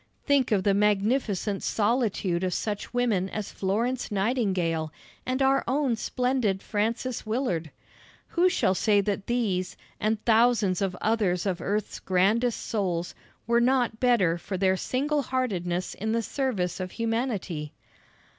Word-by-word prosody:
Think 280 -4 +2
of 200 -3 +2
the 200 - +3
magnificent 205 0 +1
solitude 205 -5 0
of 185 -1 0
such 205 -2 -3
women 230 -6 +1
as 215 0 -5
Florence 230 +6 -1
Nightingale 190 -7 0 0.4
and 260 +1 +1
our 270 0 +3
own 265 -1 +1
splendid 245 -4 0
Frances 225 +4 -2
Willard! 215 - -1 0.6
Who 355 +2 +3
shall 270 - +2
say 205 +2 +3
that 200 0 -3
these, 205 -7 -1 0.2
and 215 +1 0
thousands 225 -5 +3
of 185 -2 -1
others 205 -5 +1
of 190 -3 -1
earth's 205 +1 -2
grandest 215 +6 +1
souls, 180 -5 -2 0.3
were 235 +1 +3
not 245 -2 +2
better 195 -10 +3
for 190 +2 -4
their 190 0 +3
single 285 +9 0
heartedness 185 -10 -2
in 220 +2 -2
the 230 0 0
service 210 - -2
of 185 -1 -3
humanity? 225 - -2
215 Hz, 135 wpm, -27 LUFS, 190-245 Hz, 0.6 s, the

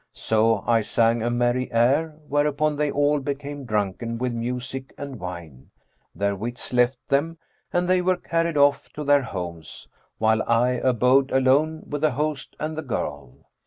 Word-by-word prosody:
So 110 -2 +1
I 115 -1 +3
sang 115 +2 +2
a 120 - 0
merry 120 +1 0
air, 140 +7 +2
whereupon 150 +1 +1
they 150 0 0
all 145 +1 +2
became 140 0 -5
drunken 110 +1 -2
with 125 0 -2
music 125 +3 -5
and 140 -4 -7
wine, 85 -7 -8 0.5
their 100 0 0
wits 120 +5 -6
left 125 +1 +3
them 160 +4 0 0.3
and 175 -1 +1
they 185 0 +3
were 185 0 +1
carried 165 -2 -1
off 145 0 +3
to 150 - -5
their 145 0 +4
homes, 90 - -7 0.3
while 110 0 +2
I 115 +2 +4
abode 130 +2 +3
alone 140 +5 +2
with 145 -1 -4
the 155 - +4
host 150 +1 -3
and 155 +1 -3
the 155 - -3
girl. 70 - -5
130 Hz, 160 wpm, -24 LUFS, 115-145 Hz, 0.5 s, their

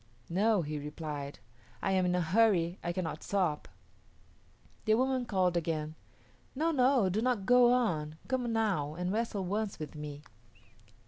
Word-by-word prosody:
"No," 205 +1 +2
he 150 0 -4
replied, 150 -1 -6 0.4
"I 195 - -1
am 185 -1 +2
in 180 - +1
a 180 - +1
hurry; 180 -1 +2
I 175 - -1
cannot 175 -2 -3
stop." 180 -7 -1 1.2
The 215 -1 +4
woman 255 0 0
called 185 -4 +1
again, 155 -2 -1 0.6
"No, 320 +5 +1
no; 255 -6 +3
do 195 +4 0
not 240 -5 0
go 245 +1 +6
on; 165 -12 0
come 250 -3 -1
now 195 -10 0
and 180 +2 -2
wrestle 215 -3 -1
once 205 +2 -2
with 155 -2 -7
me." 150 -1 -7
185 Hz, 150 wpm, -31 LUFS, 160-225 Hz, 1.2 s, go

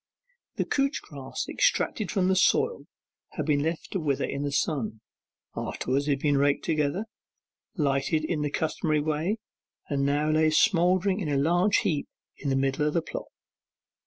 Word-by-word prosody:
The - - -1
couch 275 +1 0
grass 135 -3 -6
extracted 235 - +1
from 185 -2 +1
the 190 - +3
soil 475 - +2 0.5
had - - -3
been 145 -2 +2
left 160 +2 -3
to 190 - -1
wither 140 -4 0
in 140 - -4
the 145 0 -2
sun; 135 -7 -1 0.5
afterwards 140 +3 -2
it 140 -2 0
was 145 -1 +3
raked 140 0 +2
together, 155 +5 0 0.7
lighted 150 0 +1
in 155 -2 -1
the 150 - 0
customary 155 0 0
way, 155 +7 -1 0.5
and 140 -1 0
now 145 +2 +1
lay 155 0 +4
smouldering 185 +3 +3
in 170 -7 -2
a 140 - +1
large 175 +8 +3
heap 150 -5 0 0.3
in 140 - -3
the 135 - +2
middle 135 +2 +1
of 150 - -2
the 170 - +2
plot. - - -6
155 Hz, 165 wpm, -27 LUFS, 140-175 Hz, 0.7 s, lay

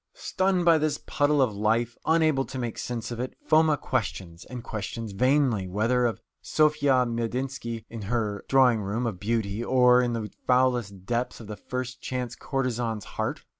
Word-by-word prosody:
Stunned 190 - 0
by 165 -2 +6
this 155 -1 0
puddle 145 -1 +2
of 110 -5 -1
life, 115 +3 +1
unable 155 -4 +3
to 130 - -7
make 120 -3 -4
sense 120 -1 -4
of 120 - -5
it, 130 +1 -4
Foma 155 -1 +4
questions, 95 -10 -3
and 125 -2 -8
questions 110 +1 -5
vainly, 125 -2 +2
whether 115 +6 +1
of 115 - -3 0.2
Sofya 145 -4 +3
Medynsky 120 0 -3
in 115 -1 -8
her 110 -4 -1
drawing 125 -5 +5
room 105 +5 -2
of 105 -6 -3
beauty, 110 0 -1
or 125 0 +5
in 120 -1 0
the 110 -3 -4 0.2
foulest 125 -7 +1
depths 120 +2 -2
of 115 - -9
the 105 0 -6
first 125 +2 -5
chance 125 -2 -4
courtesan's 120 -5 -2
heart. - - -4
120 Hz, 170 wpm, -26 LUFS, 110-135 Hz, 0.2 s, by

